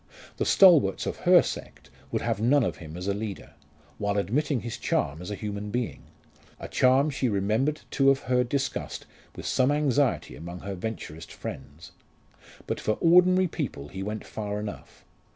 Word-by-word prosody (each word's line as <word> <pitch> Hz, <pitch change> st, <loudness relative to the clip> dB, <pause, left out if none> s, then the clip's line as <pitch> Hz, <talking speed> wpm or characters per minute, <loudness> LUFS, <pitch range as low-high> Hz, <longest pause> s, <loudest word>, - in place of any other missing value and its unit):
The -, -, 0 dB
"stalwarts" 165 Hz, -, +6 dB
of -, -, -3 dB
her -, -, +8 dB
sect -, -, -7 dB, 0.2 s
would -, -, -1 dB
have 100 Hz, -, -1 dB
none 130 Hz, +4 st, +4 dB
of -, -, -2 dB
him 80 Hz, -2 st, -9 dB
as 90 Hz, +2 st, -5 dB
a 100 Hz, -, +1 dB
leader, 105 Hz, -1 st, -6 dB, 0.5 s
while 105 Hz, -1 st, 0 dB
admitting 130 Hz, -, 0 dB
his 120 Hz, -2 st, -6 dB
charm 70 Hz, +4 st, -1 dB
as 90 Hz, -, -7 dB
a 105 Hz, -, -3 dB
human 105 Hz, 0 st, -5 dB
being 120 Hz, +1 st, -3 dB, 0.6 s
a -, -, -6 dB
charm 135 Hz, +4 st, +3 dB
she 130 Hz, -2 st, 0 dB
remembered 110 Hz, +9 st, 0 dB
to 135 Hz, -, +2 dB
have 135 Hz, 0 st, +4 dB
heard 125 Hz, -1 st, +1 dB
discussed 140 Hz, 0 st, -3 dB, 0.3 s
with -, -, -8 dB
some 130 Hz, +2 st, +2 dB
anxiety 145 Hz, -2 st, +1 dB
among 85 Hz, +2 st, -8 dB
her 100 Hz, 0 st, -5 dB
Venturist 85 Hz, -5 st, -6 dB
friends. 75 Hz, +4 st, -9 dB, 0.7 s
But -, -, -3 dB
for 110 Hz, -, 0 dB
ordinary 180 Hz, +5 st, +5 dB
people 135 Hz, -, -5 dB
he 95 Hz, -, -7 dB
went 105 Hz, +2 st, -4 dB
far 105 Hz, -1 st, -4 dB
enough. 105 Hz, -1 st, -8 dB
110 Hz, 170 wpm, -27 LUFS, 100-135 Hz, 0.7 s, her